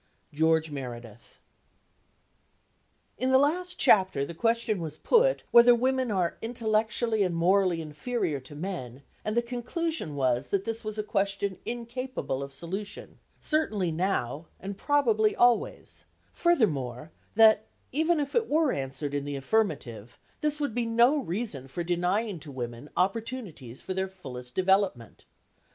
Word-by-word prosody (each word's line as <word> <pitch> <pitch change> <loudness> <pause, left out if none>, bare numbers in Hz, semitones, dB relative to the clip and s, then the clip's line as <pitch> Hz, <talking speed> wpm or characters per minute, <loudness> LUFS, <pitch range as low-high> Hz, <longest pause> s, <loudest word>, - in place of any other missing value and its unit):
GEORGE 160 +1 +2
MEREDITH. 120 -5 -8 1.8
In 255 - +1
the 260 - +7
last 355 +6 +1
chapter 185 -9 +4
the 170 - -7
question 230 +1 0
was 155 -2 -5
put - - +3
whether 240 0 +8
women 260 +1 +1
are 185 -5 0
intellectually 225 -1 0
and 180 -3 +1
morally 180 0 +2
inferior 155 - -2
to 130 +3 -13
men, 145 -7 -6 0.2
and 215 +2 -2
the 235 - +3
conclusion 250 - -3
was 130 -1 +1
that 195 -1 0
this 225 +2 -4
was 215 0 -5
a 215 - -1
question 200 -1 -1
incapable 240 - -4
of 140 0 -6
solution, 190 +8 -7 0.2
certainly 215 - 0
now, 160 -4 -1
and 195 +1 -6
probably 225 -5 +2
always; 240 -1 +1 0.3
furthermore, 155 - +1 0.2
that, 220 -1 +6 0.2
even 320 +4 +2
if 285 -1 -3
it 460 -2 +1
were 310 -2 +3
answered 135 +1 -3
in 145 -1 -1
the 145 0 -4
affirmative, 135 - -1 0.2
this 300 0 0
would 285 -6 -1
be 235 0 -1
no 240 +6 +4
reason 175 - -3
for 170 +6 -4
denying 180 +3 0
to 145 -1 -8
women 120 +1 -6
opportunities 195 - -2
for 190 - -3
their 190 0 -1
fullest 125 -10 -10
development. 190 - +1
195 Hz, 140 wpm, -28 LUFS, 150-235 Hz, 1.8 s, whether